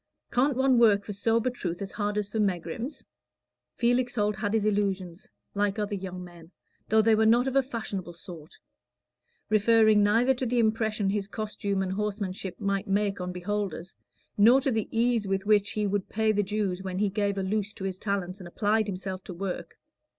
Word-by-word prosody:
Can't 260 +1 +2
one 265 -2 +4
work 205 -4 +5
for 205 - -5
sober 225 +4 +1
truth 180 -8 -4
as 195 -1 -5
hard 205 -1 -2
as 210 -1 -1
for 220 +2 -3
megrims?" 195 - -2 0.7
Felix 245 +1 +1
Holt 210 -2 0
had 210 0 -1
his 215 -2 +1
illusions, 195 -3 -1 0.2
like 205 0 0
other 210 -1 -2
young 185 -2 -5
men, 170 -2 -13 0.4
though 220 0 +5
they 225 0 +4
were 220 0 +3
not 240 +3 +4
of 265 - -2
a 275 - +6
fashionable 215 -8 -5
sort; 165 -1 -10 0.9
referring 215 0 +5
neither 230 +6 +4
to 255 0 -3
the 245 +1 0
impression 220 -3 +1
his 200 -1 -2
costume 205 -2 -2
and 185 - -3
horsemanship 195 -3 -3
might 200 -1 -1
make 200 -1 0
on 180 0 -3
beholders, 185 -1 -4 0.5
nor 235 +6 +7
to 270 - 0
the 220 -3 -1
ease 230 -2 +1
with 195 0 -1
which 210 -1 +3
he 210 -1 0
would 200 -1 -1
pay 220 0 +1
the 205 -1 +2
Jews 200 -2 -2
when 185 -1 -4
he 205 +1 +2
gave 200 -1 0
a 195 - -1
loose 205 +1 -1
to - - -8
his 190 -1 -3
talents 200 -2 -2
and 180 - -9
applied 215 +4 +1
himself 190 -1 -5
to 180 - -7
work. 190 +1 -5
205 Hz, 195 wpm, -27 LUFS, 190-220 Hz, 0.9 s, nor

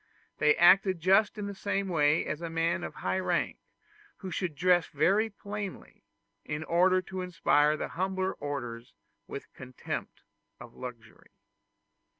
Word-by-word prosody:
They 150 0 +5
acted 185 +1 +5
just 195 +5 +3
in 205 - -4
the 200 - -4
same 200 0 -2
way 155 -3 +2
as 155 - -4
a 170 - -4
man 165 +2 0
of - - -6
high 190 - -1
rank 185 - -1 0.6
who 190 -2 -7
should 175 -2 -3
dress 175 +2 +3
very 195 +9 +2
plainly, 205 -1 -7 0.4
in 150 +1 -4
order 185 +3 +3
to 190 0 -6
inspire 155 -4 +2
the - - -4
humbler 190 +1 -1
orders 120 -5 -6 0.3
with - - -7
a - - -39
contempt 130 -1 -7 0.4
of 120 -1 -12
luxury. 115 -3 -10
175 Hz, 150 wpm, -29 LUFS, 150-190 Hz, 0.6 s, They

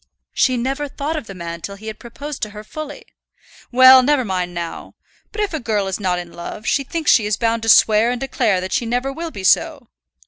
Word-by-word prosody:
"She 255 -2 +2
never 270 +4 -2
thought 285 +3 -4
of 300 -8 -5
the 195 - -9
man 170 -1 -7
till 200 - -6
he 210 +2 -14
had 220 0 -7
proposed 280 +4 -8
to 215 - -2
her 210 +1 -10
fully." 295 +6 -8 0.7
"Well, 260 +1 +8
never 270 -1 +2
mind 180 -3 -2
now. 170 -1 -7 0.4
But 425 - -4
if 410 -4 -2
a 315 - -2
girl 215 -5 -1
is 190 +1 -3
not 185 -3 0
in 175 -1 -7
love, 190 +5 -8
she 275 - +1
thinks 320 +2 0
she 220 -4 +4
is 210 -2 0
bound 230 -1 0
to 225 - -2
swear 215 +1 +5
and 245 0 -2
declare 235 -7 0
that 185 0 -5
she 235 - 0
never 250 +3 -1
will 330 +3 -5
be 200 -11 -9
so." - - +2
230 Hz, 235 wpm, -19 LUFS, 200-270 Hz, 0.7 s, Well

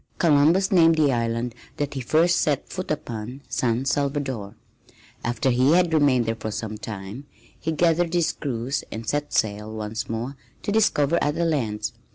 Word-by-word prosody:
Columbus 165 +4 +4
named 165 -3 +6
the 150 -3 +3
island 115 0 -1 0.2
that 145 -1 -2
he 135 - -3
first 165 +7 +3
set 145 -3 0
foot 185 0 -5
upon 120 -3 -4
San 125 0 0
Salvador. 135 -7 -1 0.7
After 120 +2 0
he 130 +5 +4
had 175 -1 +3
remained 140 -6 +4
there 115 - 0
for 110 -1 -5
some 110 0 -4
time 105 +6 -7 0.3
he 160 - -2
gathered 170 +1 +2
his 170 -2 +2
crews 125 -1 -3
and 110 0 -6
set 145 0 -1
sail 105 0 0
once 110 0 -4
more 115 +5 -3 0.3
to - - -1
discover 170 -7 +3
other 150 +4 +1
lands. 110 -9 -1
135 Hz, 165 wpm, -24 LUFS, 115-155 Hz, 0.7 s, named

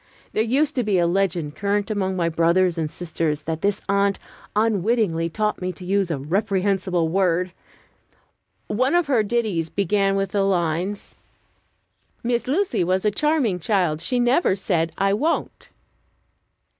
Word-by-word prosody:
There - - +1
used 275 +7 +1
to 250 - +2
be 205 -3 +1
a 175 - +3
legend 175 -4 0
current 205 +1 -1
among 190 -2 -1
my 170 -2 0
brothers 170 +2 +2
and 160 -3 -2
sisters 160 -3 -2
that 160 +1 -4
this 200 0 0
aunt 200 0 +2 0.4
unwittingly 210 -5 +1
taught 210 +4 -1
me 180 0 -2
to 180 +1 -11
use 195 0 +1
a 160 - -1
reprehensible 190 +2 0
word. 180 0 +1 1.1
One 255 +9 +1
of 350 -1 +3
her 265 -6 +2
ditties 210 -7 -1
began 195 +1 +1
with 195 -1 -1
the 205 - +1
lines: 185 +1 -1 1.1
"Miss 240 0 -1
Lucy 345 - +1
was 185 +3 0
a 210 - +3
charming 270 - +1
child; 175 -5 0
She 245 +9 0
never 245 - +3
said, 170 -4 -1
'I 195 0 +2
won't.'" 295 +11 -2
195 Hz, 150 wpm, -23 LUFS, 170-215 Hz, 1.1 s, a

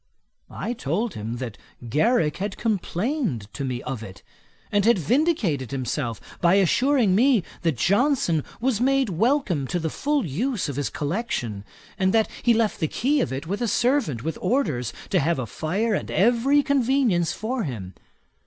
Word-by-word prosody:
I 240 - -4
told 205 - -2
him, 110 +3 -5
that 120 -4 -6 0.3
Garrick 155 - +2
had 195 +1 -4
complained 205 - -1
to 140 - -4
me 125 -2 -3
of 130 -4 -4
it, 95 -4 -10 0.5
and 205 -1 +2
had 235 +1 +5
vindicated 205 - +1
himself 125 -3 -3 0.2
by 175 +2 +5
assuring 230 - +3
me, 235 0 +4 0.2
that 165 -6 0
Johnson 200 - +2 0.2
was 240 -2 0
made 270 -1 +2
welcome 190 - +1
to 175 - -1
the 160 -2 -2
full 290 -4 0
use 205 - -1
of 140 - -4
his 145 0 -1
collection, 145 - -3 0.4
and 190 +2 +2
that 220 -1 +4
he 240 - +3
left 220 -2 +1
the 160 - +1
key 275 - +1
of - - -1
it 135 +3 -4
with 200 +7 -3
a 240 - +1
servant, 240 - +1
with 160 0 -3
orders 180 - 0 0.2
to 185 - +4
have 165 +3 +1
a 130 - -2
fire 190 - -1
and - - -2
every 245 +7 +3
convenience 255 - +2
for 240 +3 -3
him. 105 - -5
190 Hz, 170 wpm, -24 LUFS, -, 0.5 s, had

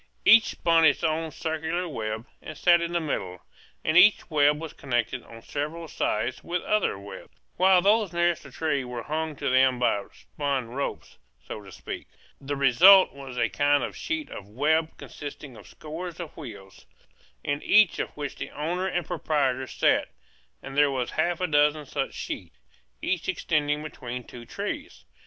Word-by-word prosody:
Each 225 -1 +8
spun 165 -1 +2
its 150 0 +4
own 160 0 0
circular 160 +3 -3
web, 110 -6 -4 0.2
and 155 - -9
sat 175 +1 +5
in 170 0 -2
the 175 - +1
middle; 95 - -4 0.4
and 155 - +1
each 185 0 +6
web 150 0 +4
was 160 -1 -7
connected 125 -1 -2
on 115 -1 -13
several 155 +3 -4
sides 120 -3 -2
with 175 0 -3
other 215 - +1
webs, 100 +1 -11 0.2
while 185 0 +5
those 210 -1 +3
nearest 175 -1 +1
the 140 - -12
trees 145 0 -1
were 125 -2 -6
hung 155 +2 -3
to - - -4
them 130 0 +4
by 110 -4 +1
spun 140 -5 -3
ropes, 140 +4 -5 0.3
so 105 - -7
to 100 -1 -13
speak. - - -7 0.3
The 140 +1 -4
result 170 +9 +7
was 135 -2 -9
a 115 -1 +2
kind 145 0 +2
of - - -5
sheet 320 -1 -4
of 100 0 -9
web 155 +7 +1
consisting 145 -2 -9
of - - -14
scores 165 +3 -8
of 170 -3 -7
wheels, 100 -10 -11 0.6
in 145 +1 -2
each 210 -3 +4
of - - -2
which 145 -2 -4
the - - -5
owner 175 +5 -2
and 175 -3 -2
proprietor 135 -5 -1
sat; - - +1 0.5
and 135 - -8
there 145 0 +5
were 130 -3 -1
half 170 +5 -1
a - - +2
dozen 150 -1 +2
such 135 0 -3
sheets, - - -6 0.5
each 185 -2 -1
extending 150 -4 0
between 125 -5 -6
two 120 0 -12
trees. - - -6
150 Hz, 175 wpm, -26 LUFS, 130-170 Hz, 0.6 s, Each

